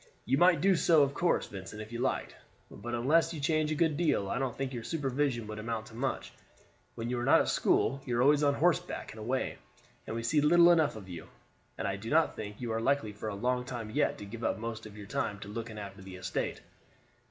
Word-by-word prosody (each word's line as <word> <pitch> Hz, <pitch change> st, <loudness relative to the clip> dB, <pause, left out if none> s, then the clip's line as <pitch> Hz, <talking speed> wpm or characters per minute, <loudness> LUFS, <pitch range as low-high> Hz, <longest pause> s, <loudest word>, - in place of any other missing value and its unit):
"You 130 Hz, -, +2 dB
might 175 Hz, -4 st, +5 dB
do 195 Hz, -1 st, +5 dB
so, 165 Hz, -3 st, +5 dB
of 140 Hz, 0 st, 0 dB
course, 170 Hz, +3 st, +1 dB
Vincent, 95 Hz, +2 st, -8 dB
if 110 Hz, +1 st, -8 dB
you 120 Hz, -, -5 dB
liked; 130 Hz, +2 st, -1 dB, 0.4 s
but 120 Hz, +3 st, -5 dB
unless 155 Hz, +8 st, +2 dB
you -, -, -5 dB
change 155 Hz, +1 st, +1 dB
a -, -, +1 dB
good 160 Hz, -2 st, +2 dB
deal, 150 Hz, -, +1 dB
I -, -, -1 dB
don't 130 Hz, -3 st, -2 dB
think 135 Hz, -1 st, -3 dB
your 120 Hz, -, -4 dB
supervision 135 Hz, -5 st, -1 dB
would 110 Hz, 0 st, -6 dB
amount 110 Hz, 0 st, -3 dB
to -, -, -14 dB
much. 130 Hz, +4 st, -3 dB, 0.6 s
When 115 Hz, -, -4 dB
you 125 Hz, -, -1 dB
are -, -, -2 dB
not -, -, +6 dB
at -, -, -1 dB
school 135 Hz, +3 st, +2 dB
you 120 Hz, -3 st, -2 dB
are 120 Hz, -, +4 dB
always 145 Hz, +2 st, +5 dB
on 145 Hz, -1 st, +3 dB
horseback 170 Hz, +2 st, 0 dB
and 110 Hz, -, -11 dB
away, 125 Hz, +5 st, -2 dB, 0.5 s
and 110 Hz, -, -4 dB
we 115 Hz, -, -3 dB
see 145 Hz, +6 st, +2 dB
little 170 Hz, +3 st, +7 dB
enough 160 Hz, -7 st, +3 dB
of 100 Hz, -3 st, -9 dB
you, 85 Hz, -3 st, -8 dB, 0.5 s
and -, -, -2 dB
I 100 Hz, 0 st, -2 dB
do 110 Hz, +3 st, -7 dB
not 160 Hz, +1 st, +3 dB
think 105 Hz, -1 st, -7 dB
you 120 Hz, -2 st, -3 dB
are 110 Hz, 0 st, -1 dB
likely 115 Hz, -4 st, +1 dB
for 105 Hz, +1 st, -5 dB
a 100 Hz, -, -4 dB
long 125 Hz, +4 st, 0 dB
time 120 Hz, -4 st, -6 dB
yet 145 Hz, +6 st, +1 dB
to 105 Hz, -, -8 dB
give 115 Hz, +3 st, -8 dB
up -, -, 0 dB
most 110 Hz, -1 st, -5 dB
of 105 Hz, 0 st, -13 dB
your 105 Hz, -, -8 dB
time 105 Hz, -2 st, -2 dB
to 100 Hz, -, -7 dB
looking 110 Hz, +1 st, -6 dB
after 100 Hz, -1 st, -8 dB
the 95 Hz, 0 st, -9 dB
estate." 90 Hz, -, -3 dB
120 Hz, 245 wpm, -31 LUFS, 110-145 Hz, 0.6 s, little